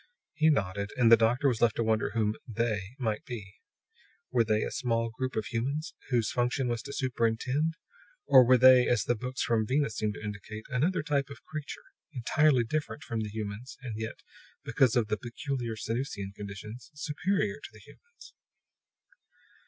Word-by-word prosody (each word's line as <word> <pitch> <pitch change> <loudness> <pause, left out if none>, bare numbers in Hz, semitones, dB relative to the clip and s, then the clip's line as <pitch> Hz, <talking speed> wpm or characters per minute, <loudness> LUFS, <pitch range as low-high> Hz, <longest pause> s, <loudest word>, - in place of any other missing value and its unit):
He 155 0 +3
nodded; 100 -7 0
and 120 -2 +5
the - - +12
doctor 115 +5 +2
was 120 -4 0
left 115 -3 +4
to 115 - 0
wonder 110 -1 +1
whom 105 -2 +2
"They" 115 -2 -2
might 110 -5 -2
be. 105 -5 -8 0.7
Were 120 -2 +4
They 110 -1 +1
a - - -3
small 115 -2 -1
group 130 +3 -4
of 110 - -1
humans, 140 - -2 0.2
whose 120 -5 +1
function 125 +2 0
was 120 -1 -1
to 140 - -8
superintend? 130 +5 0 0.5
Or 130 -2 +8
were 125 +1 +6
They, 130 0 +7
as 120 -3 +2
the 120 - +1
books 125 +3 -3
from 110 -2 +1
Venus 135 -3 0
seemed 105 -1 -1
to - - -9
indicate, 105 +1 -6
another 155 +7 +1
type 145 -2 0
of 140 - -11
creature, 155 -1 -7 0.3
entirely 130 +1 +3
different 150 +4 -3
from 115 - -3
the 110 -1 -3
humans, 110 +3 -6
and 120 -4 -5
yet, 110 +1 -6 0.4
because 130 -4 +3
of 120 -3 +2
the 105 - -1
peculiar 120 -1 -4
Sanusian 110 -3 -4
conditions, 105 +6 -8
superior 190 +8 -1
to - - -9
the - - -15
humans? 475 0 -17
120 Hz, 175 wpm, -29 LUFS, 110-135 Hz, 0.7 s, the